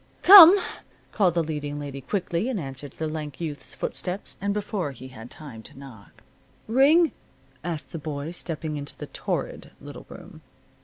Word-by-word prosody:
"Come!" 385 0 +11 0.5
called 185 -5 +1
the 170 - +2
leading 150 -2 -5
lady 140 -1 -7
quickly, 185 - -2
in 255 - -2
answer 135 -3 -7
to - - -23
the 160 - -3
lank 155 -3 -6
youth's 155 -4 -6
footsteps, 185 +2 -4
and 200 +1 -1
before 200 -7 -3
he 130 +1 -11
had 130 - -16
had 115 +2 -10
time 135 -8 -11
to 110 - -13
knock. 125 -7 -14 0.4
"Ring?" 290 +8 +4 0.5
asked 165 -3 -5
the 165 - -6
boy, 150 0 -5
stepping 160 -3 -5
into 145 0 -7
the - - -7
torrid - - -4
little - - -11
room. - - -12
155 Hz, 170 wpm, -25 LUFS, 140-200 Hz, 0.5 s, Come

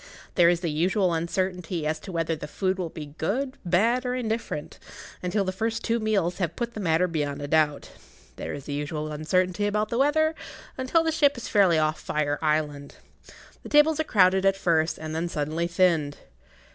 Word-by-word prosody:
There 170 -2 +5
is 175 -1 +1
the 170 -3 -1
usual 180 +4 +1
uncertainty 175 0 -2
as 155 +1 -1
to 190 - -9
whether 165 -1 -1
the 150 -1 -7
food 190 +4 -1
will 175 -3 -2
be 150 -2 -9
good, 260 - -2
bad, 225 +8 +2
or 250 0 -1
indifferent, 225 -10 -4 0.4
until 190 +3 0
the 185 - -2
first 225 +4 -2
two 230 0 0
meals 200 -5 0
have 175 -4 -1
put 235 -1 -3
the - - -6
matter 175 -1 +2
beyond[Pg 165 -3 -3
17] 145 0 -4
a 145 - -4
doubt; 150 -1 +1 0.4
there - - -5
is 140 -1 -7
the 145 - -5
usual 150 +1 -3
uncertainty 185 +6 0
about 210 +1 0
the 235 - -1
weather, 315 +3 +3 0.4
until 260 +6 +1
the 325 - +1
ship 290 -3 +3
is 240 - -6
fairly 190 -6 +4
off 155 0 +1
Fire 145 -1 -1
Island. 150 -2 -1 0.7
The - - -10
tables 295 +1 +4
are - - +2
crowded 190 -7 +3
at 195 0 +3
first, 165 -3 +1
and 155 0 -6
then 165 +2 -2
suddenly 155 +2 -2
thinned. 170 -5 +1
180 Hz, 195 wpm, -26 LUFS, 155-215 Hz, 0.7 s, There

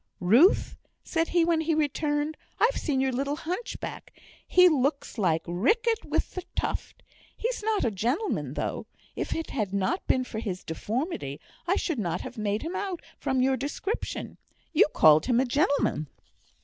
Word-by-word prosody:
"Ruth," 235 - +4 0.3
said 330 -1 0
he, 340 -1 +3
when 330 -1 +2
he 320 0 +1
returned, 295 0 0 0.2
"I've - - +3
seen 280 -5 0
your 265 0 +1
little 275 +3 -1
hunchback. 360 +9 -5 0.4
He 365 0 +7
looks 280 -5 0
like 165 -5 +2
Riquet 425 - +1
with - - -1
the 365 - -4
Tuft. - - -3 0.3
He's 475 +1 -2
not 425 - +1
a 230 - +1
gentleman, 245 - -1
though. - - -3 0.3
If - - -2
it 325 - -4
had 210 -6 -2
not 200 - -1
been 255 - +3
for 220 -3 -5
his 190 -5 -4
deformity, 185 - -3 0.3
I 370 - +3
should 330 -10 -1
not 175 -3 -1
have - - -7
made 210 -1 -1
him 335 +4 -4
out 380 -4 -3 0.2
from 260 -1 +1
your 265 0 +3
description; 295 - -4 0.3
you 345 +7 +6
called 155 +3 +6
him 245 -2 +3
a 260 - +3
gentleman." 275 - +1
280 Hz, 165 wpm, -27 LUFS, 215-340 Hz, 0.4 s, He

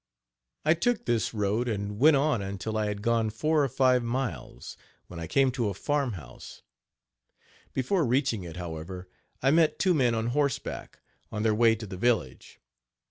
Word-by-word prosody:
I 155 - +6
took 235 +7 0
this 115 -1 0
road 105 +3 0
and 105 -2 -3
went 155 +3 +6
on 140 -5 +1
until 100 +2 -4
I 110 -1 0
had 105 0 -4
gone 115 -1 +2
four 150 +7 +1
or 135 - 0
five 130 0 +3
miles, 120 - -4 0.3
when 85 - -9
I 85 - -5
came 135 - +3
to 120 -4 -1
a 100 - -5
farm 140 +2 -1
house. 70 -9 -11 1.1
Before 165 +7 0
reaching 125 -5 +1
it, 85 -1 -8
however, 90 +2 -6 0.4
I 135 - +4
met 160 0 +3
two 185 -1 +3
men 125 -7 +2
on 115 +1 -1
horseback, 140 -3 -2 0.3
on 105 -1 -3
their 110 -1 +3
way 115 +1 +4
to 110 0 -7
the 95 -2 -7
village. 110 - -1
115 Hz, 175 wpm, -28 LUFS, 100-135 Hz, 1.1 s, I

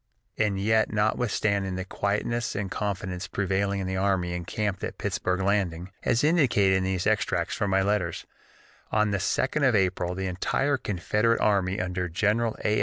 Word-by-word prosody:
And 105 -3 0
yet 110 +2 +2
notwithstanding 105 -3 0
the 95 0 -4
quietness 105 +4 -1
and 100 -2 -3
confidence 95 -3 -3
prevailing 100 +1 -1
in - - -3
the 95 0 -2
army 95 -2 +1
encamped 95 +3 -3
at - - -4
Pittsburg 90 +1 -1
Landing, 95 -3 0
as 125 +1 +1
indicated 130 - +4
in 95 - -1
these 95 -1 -1
extracts 110 0 +1
from 105 - -1
my 95 0 +3
letters, 95 -4 -1 0.7
on 105 -1 +2
the 100 - 0
2d 130 - 0
of 120 - +1
April 90 -2 +1
the 95 +1 -3
entire 135 +10 0
Confederate 105 +2 0
army 100 -2 +1
under 90 -1 -2
General 105 +6 +1
A. 105 0 +2
100 Hz, 165 wpm, -26 LUFS, 95-105 Hz, 0.7 s, indicated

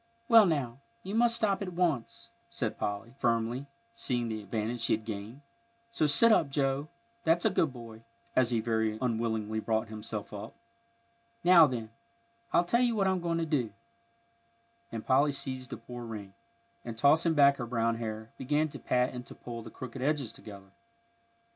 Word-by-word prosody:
"Well, 225 -4 +8
now, 135 -7 -1 0.2
you 195 - -5
must 230 +1 +4
stop 210 -4 +1
at 185 -2 -4
once," 170 -9 -1 0.2
said - - -3
Polly, 105 +4 -3
firmly, 120 +3 0 0.3
seeing 125 - -1
the 110 -1 -4
advantage 110 +3 -3
she 115 - +2
had 110 0 -2
gained. 110 +5 -6 0.5
"So 155 -9 +1
sit 230 +11 +6
up, 160 -9 +4
Joe, 135 +1 0 0.4
that's 165 +3 +2
a 220 - +4
good 165 -5 +2
boy," 115 -3 -10 0.3
as 130 -2 +4
he 115 -2 +1
very 110 -1 0
unwillingly 110 -3 -1
brought 110 0 -1
himself 105 -1 -6
up. 100 - -7 0.9
"Now, 175 -3 +8
then, 115 -4 -5 0.6
I'll 175 - +3
tell 235 +8 +2
you 240 -2 +2
what 200 -2 +2
I'm 190 -1 +1
going 170 -1 -1
to 165 - 0
do," 130 -9 -1 1.2
and 115 -1 -5
Polly 140 +3 +4
seized 130 -2 -4
the - - -6
poor 120 +1 -9
ring, 105 -4 -7 0.5
and, 115 -2 -7
tossing 160 +6 +4
back 140 -1 +6
her 120 - -4
brown 115 -1 0
hair, 110 -1 -5
began 150 +4 +1
to - - -9
pat 125 0 +1
and 125 -1 -6
to - - -10
pull 115 -1 -7
the - - -9
crooked 130 0 -8
edges 140 -4 0
together. 100 -3 -12
125 Hz, 175 wpm, -30 LUFS, 115-155 Hz, 1.2 s, Well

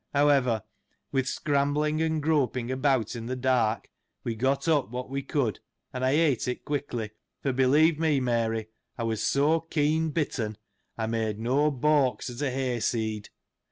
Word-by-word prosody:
However, 135 -6 +3 0.5
with 130 -1 0
scrambling, 150 +2 0
and 160 -2 0
groping 130 -5 +1
about 130 -4 +1
in 115 -1 -6
the 130 - -2
dark, 125 -4 +1 0.4
we 115 - -2
got 130 +7 0
up 150 -8 +2
what 125 +2 -5
we 140 0 -1
could, 130 -7 -1 0.3
and 125 - -3
I 130 - +3
ate 145 -4 +2
it 125 - -4
quick 145 -1 -2
ly, 110 -3 -3 0.3
for, 135 - +1
believe 145 +5 +4
me, 155 -4 +2
Mary, 115 -3 0 0.3
I 115 - -3
was 115 -1 -1
so 150 +4 +3
keen 160 0 0
bitten, 125 -9 -2 0.4
I 110 - -1
made 110 -2 -1
no 135 +7 +2
balks^ 140 -2 +1
at 120 +3 -7
a 145 - +1
hay 130 -2 -1
seed. 110 -2 -2
130 Hz, 165 wpm, -27 LUFS, 115-145 Hz, 0.5 s, believe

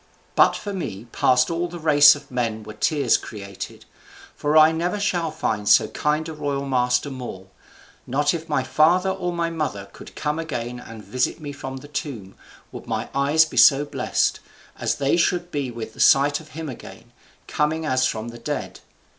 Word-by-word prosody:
But - - +4
for 205 - -5
me 115 - -5
past 125 +3 +3
all 170 +1 -1
the 175 0 -8
race 145 -3 +7
of 145 -1 -13
men 115 -3 -2
were 110 0 -9
tears 140 +2 +2
created; 100 -3 -9 0.5
for 150 +1 +1
I 155 +1 +7
never 175 +5 -2
shall 175 -5 0
find 110 -9 -2
so 110 - +5
kind 150 +2 -1
a 160 - -6
royal 145 -2 -3
master 125 +1 +1
more; 120 -8 -8 0.6
not 145 +3 +1
if 165 -1 -6
my 145 -3 +1
father 175 +7 +3
or 185 -2 -3
my 170 -1 -2
mother 105 -12 -4
could - - -13
come 150 +1 -2
again 125 -6 -4
and 115 -3 -11
visit 130 +5 -1
me 145 -2 -6
from 135 -2 -7
the 135 - -11
tomb, 125 -10 -6 0.4
would - - -10
my - - -3
eyes 145 +3 +4
be 160 - -9
so 140 0 +6
blessed, - - 0 0.4
as - - 0
they 140 +3 +1
should 175 0 0
be 140 -3 -2
with 115 -2 -7
the - - -16
sight 140 +1 +5
of 160 - -14
him 160 -1 -5
again, 130 - -10 0.4
coming 155 +2 -1
as 130 -2 +2
from 110 +1 -4
the 120 0 -10
dead. 115 - -5
145 Hz, 190 wpm, -23 LUFS, 125-160 Hz, 0.6 s, race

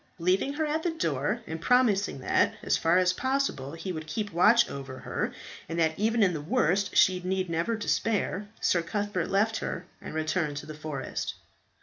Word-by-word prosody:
Leaving 185 +10 +1
her 315 +2 -1
at 305 +1 -1
the 345 - 0
door, 165 - -1
and 160 0 -6
promising 205 - +2
that, - - +2
as - - +2
far 165 +2 +3
as 185 0 +3
possible, 260 - -1
he 165 +3 -5
would 155 -2 -6
keep 205 +5 -3
watch 210 +8 +5
over 135 -1 -7
her, - - -3 0.4
and 165 - -3
that 160 -1 +2
even 220 +1 +3
in 185 -3 +3
the 155 - -3
worst 185 +6 +1
she 185 -1 +5
need 185 -1 -1
never 170 +8 0
despair, 210 -2 -1
Sir 170 - +2
Cuthbert 200 +1 -2
left 215 +3 +2
her 175 - -4 0.2
and - - -7
returned 155 -1 -1
to - - -6
the 155 - -7
forest. 155 -3 -4
185 Hz, 190 wpm, -28 LUFS, 160-215 Hz, 0.4 s, watch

